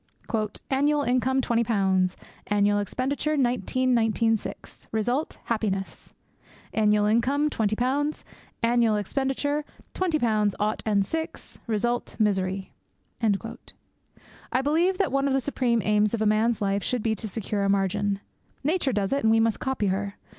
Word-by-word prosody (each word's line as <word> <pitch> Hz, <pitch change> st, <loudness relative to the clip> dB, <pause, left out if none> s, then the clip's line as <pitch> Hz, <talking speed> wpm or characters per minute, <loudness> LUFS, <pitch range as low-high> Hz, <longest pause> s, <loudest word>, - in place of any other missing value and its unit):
'Annual 290 Hz, +2 st, +2 dB
income 260 Hz, +1 st, +2 dB
twenty 235 Hz, -2 st, +1 dB
pounds; 190 Hz, -5 st, +1 dB, 0.3 s
annual 205 Hz, 0 st, +2 dB
expenditure 275 Hz, +8 st, -1 dB
nineteen 255 Hz, 0 st, +1 dB
nineteen 225 Hz, -1 st, +3 dB
six; 215 Hz, -, -8 dB
result 245 Hz, +7 st, -1 dB
happiness. 205 Hz, -4 st, -2 dB, 0.6 s
Annual 210 Hz, -1 st, +3 dB
income 270 Hz, +8 st, +2 dB
twenty 215 Hz, -3 st, 0 dB
pounds; 280 Hz, +6 st, -1 dB, 0.4 s
annual 230 Hz, -2 st, +3 dB
expenditure 270 Hz, +7 st, -1 dB, 0.3 s
twenty 360 Hz, -4 st, +1 dB
pounds 215 Hz, -6 st, +1 dB
ought 210 Hz, +1 st, 0 dB
and 200 Hz, -2 st, +2 dB
six; 320 Hz, +9 st, -5 dB
result 240 Hz, +2 st, -1 dB
misery.' 190 Hz, -3 st, 0 dB, 1.8 s
I 255 Hz, -, +2 dB
believe 335 Hz, +6 st, +2 dB
that 390 Hz, -7 st, +1 dB
one 275 Hz, +1 st, +1 dB
of 275 Hz, -, +1 dB
the 270 Hz, -, +3 dB
supreme 245 Hz, -4 st, 0 dB
aims 210 Hz, +1 st, +3 dB
of 220 Hz, -, -4 dB
a -, -, +1 dB
man's 215 Hz, +1 st, +2 dB
life 200 Hz, 0 st, +1 dB
should 250 Hz, 0 st, -2 dB
be 225 Hz, -, +1 dB
to 220 Hz, +1 st, -5 dB
secure 210 Hz, 0 st, -2 dB
a 195 Hz, -, +1 dB
margin. 200 Hz, +1 st, 0 dB, 0.4 s
Nature 300 Hz, -3 st, +1 dB
does 205 Hz, +2 st, 0 dB
it, 280 Hz, -, +1 dB
and 220 Hz, -, +4 dB
we 225 Hz, 0 st, +5 dB
must 225 Hz, -2 st, +1 dB
copy 265 Hz, -5 st, -1 dB
her. 200 Hz, +1 st, -1 dB
225 Hz, 145 wpm, -26 LUFS, 205-265 Hz, 1.8 s, we